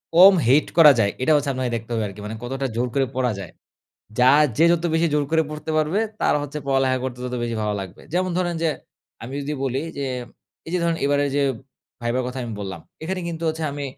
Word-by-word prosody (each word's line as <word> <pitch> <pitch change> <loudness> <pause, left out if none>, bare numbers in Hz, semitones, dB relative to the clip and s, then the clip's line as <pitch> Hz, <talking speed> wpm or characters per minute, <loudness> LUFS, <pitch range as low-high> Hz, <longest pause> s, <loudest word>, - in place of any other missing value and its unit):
কম 190 +3 +9
hate 140 +4 +4
করা 155 -3 +10
যায়, 100 -2 +3
এটা 145 - +2
হচ্ছে 145 -1 +1
আপনাকে 130 -2 -2
দেখতে 115 0 -6
হবে 110 -1 0
আরকি। 100 +1 -10
মানে 110 +2 -5
কতটা 135 +2 -3
জোর 125 +2 0
করে 135 -1 +2
পড়া 125 -2 +1
যায়। 95 - -8 0.7
যা 125 +1 +6 0.3
যে 165 - +6
যত 170 0 0
বেশি 165 +1 +3
জোর 150 -1 +2
করে 160 0 +3
পড়তে 155 +1 -6
পারবে, 155 +6 +1 0.2
তার - - +3
হচ্ছে 145 +1 -5
পড়ালেখা 135 -1 +2
করতে 125 -2 -4
তত 125 0 -3
বেশি 120 -1 -2
ভালো 105 0 0
লাগবে। 95 -2 -9
যেমন 185 +1 +1
ধরেন 175 -1 0
যে 165 - +3 0.5
আমি 130 +4 -7
যদি 150 +2 -3
বলি 135 +2 -1 0.2
যে, 140 - -2 0.6
এই 165 - -6
যে 180 - +1
ধরুন 170 -1 +1
এইবারে 145 0 +2
যে 145 - +3 0.6
ভাইবার 120 +2 0
কথা 125 +1 -5
আমি 115 - -5
বললাম, 95 -4 -5 0.2
এখানে 185 +3 -3
কিন্তু 165 -1 -5
হচ্ছে 160 0 -3
আমি 145 0 -4
140 Hz, 225 wpm, -23 LUFS, 125-160 Hz, 0.7 s, করা